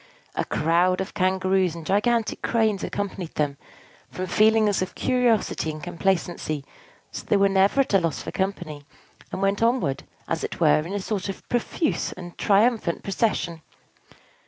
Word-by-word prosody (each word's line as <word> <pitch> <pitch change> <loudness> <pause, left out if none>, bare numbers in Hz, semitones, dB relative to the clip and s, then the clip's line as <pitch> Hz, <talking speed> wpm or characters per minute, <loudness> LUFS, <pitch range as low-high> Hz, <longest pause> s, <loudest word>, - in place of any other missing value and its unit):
A - - -1
crowd 175 +4 +2
of 190 - -4
Kangaroos 185 -2 +1
and 165 -2 -8
gigantic 220 +4 +1
Cranes 220 -4 +1
accompanied 195 -4 -4
them, 145 -2 -1 0.5
from 185 - -4
feelings 215 +2 +3
of 185 - -3
curiosity 240 -9 +1
and 155 -1 -6
complacency; 170 -5 -1 0.5
so - - -5
that - - -22
they 205 - +4
were 200 0 +5
never 195 +7 +3
at 265 - -2
a 195 - +6
loss 165 -4 -1
for - - -6
company, 175 -6 -3 0.5
and 195 - -3
went 195 +2 +1
onward, 230 - +1 0.3
as - - -2
it - - -4
were, - - +5
in 165 +5 -5
a 205 - -1
sort 200 0 -3
of 195 - -7
profuse 275 +6 -1
and 175 -1 -10
triumphant 210 -3 +2
procession. 190 -5 -1
190 Hz, 160 wpm, -24 LUFS, 170-215 Hz, 0.5 s, a